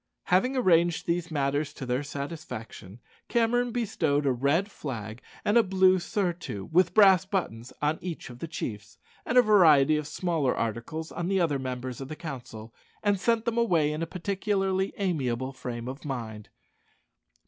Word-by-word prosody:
Having 250 Hz, +9 st, +2 dB
arranged 170 Hz, -7 st, +3 dB
these 170 Hz, 0 st, -1 dB
matters 145 Hz, 0 st, -1 dB
to 135 Hz, -, -6 dB
their 125 Hz, +2 st, 0 dB
satisfaction, 140 Hz, -, -7 dB, 0.3 s
Cameron 240 Hz, +1 st, +2 dB
bestowed 160 Hz, -11 st, 0 dB
a 135 Hz, -, +3 dB
red 145 Hz, -, +1 dB
flag 110 Hz, -, -6 dB, 0.2 s
and 210 Hz, +3 st, +5 dB
a -, -, +7 dB
blue 190 Hz, -2 st, +4 dB
surtout 175 Hz, -, -3 dB
with 180 Hz, +1 st, +3 dB
brass 195 Hz, -4 st, +7 dB
buttons 150 Hz, -, -3 dB
on 150 Hz, +2 st, +1 dB
each 170 Hz, -7 st, -6 dB
of 120 Hz, -, -12 dB
the 165 Hz, -, -5 dB
chiefs, 110 Hz, -9 st, -6 dB, 0.3 s
and 250 Hz, -, +1 dB
a 250 Hz, -, +8 dB
variety 155 Hz, -, +6 dB
of 150 Hz, -1 st, -4 dB
smaller 160 Hz, -8 st, -1 dB
articles 120 Hz, +9 st, -3 dB
on 175 Hz, -, -3 dB
the 195 Hz, 0 st, +1 dB
other 155 Hz, -6 st, +1 dB
members 130 Hz, -1 st, -5 dB
of 135 Hz, -, -6 dB
the 155 Hz, -, -6 dB
council, 120 Hz, -8 st, -8 dB, 0.3 s
and 205 Hz, -2 st, +2 dB
sent 230 Hz, +2 st, +1 dB
them 235 Hz, 0 st, 0 dB
away 170 Hz, -10 st, +2 dB
in 155 Hz, +1 st, -4 dB
a 165 Hz, -, -2 dB
particularly 195 Hz, +1 st, -1 dB
amiable 135 Hz, -9 st, -1 dB
frame 120 Hz, -2 st, -6 dB
of 135 Hz, +3 st, -7 dB
mind. 115 Hz, -7 st, -6 dB
160 Hz, 165 wpm, -27 LUFS, 130-190 Hz, 0.3 s, a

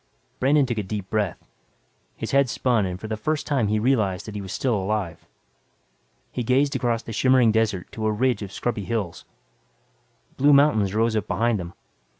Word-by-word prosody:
Brandon 140 Hz, +2 st, +4 dB
took 120 Hz, -3 st, -2 dB
a -, -, +1 dB
deep 100 Hz, -1 st, -5 dB
breath. 105 Hz, -5 st, 0 dB, 0.8 s
His -, -, -5 dB
head 140 Hz, -2 st, +3 dB
spun 115 Hz, -5 st, +1 dB
and 90 Hz, 0 st, -5 dB
for 110 Hz, -, -7 dB
the 110 Hz, -, -2 dB
first 150 Hz, +8 st, -2 dB
time 135 Hz, -8 st, +1 dB
he 105 Hz, +1 st, +1 dB
realized 105 Hz, -6 st, +1 dB
that 110 Hz, -, -7 dB
he 105 Hz, -, -5 dB
was 95 Hz, -1 st, -7 dB
still 130 Hz, -3 st, 0 dB
alive. 100 Hz, -4 st, -2 dB, 1.0 s
He 125 Hz, -, -3 dB
gazed 135 Hz, +4 st, +2 dB
across 120 Hz, -2 st, 0 dB
the 115 Hz, -, -7 dB
shimmering 130 Hz, -1 st, +4 dB
desert 110 Hz, -4 st, 0 dB
to 110 Hz, -1 st, -3 dB
a -, -, +2 dB
ridge 120 Hz, +1 st, +1 dB
of 100 Hz, -2 st, -6 dB
scrubby 105 Hz, -1 st, -3 dB
hills. 105 Hz, -8 st, -3 dB, 1.1 s
Blue 145 Hz, +2 st, +5 dB
mountains 110 Hz, -9 st, +4 dB
rose 115 Hz, 0 st, +2 dB
up 105 Hz, -, -1 dB
beyond 110 Hz, +2 st, +1 dB
them. 85 Hz, -1 st, -7 dB
110 Hz, 185 wpm, -24 LUFS, 100-125 Hz, 1.1 s, Blue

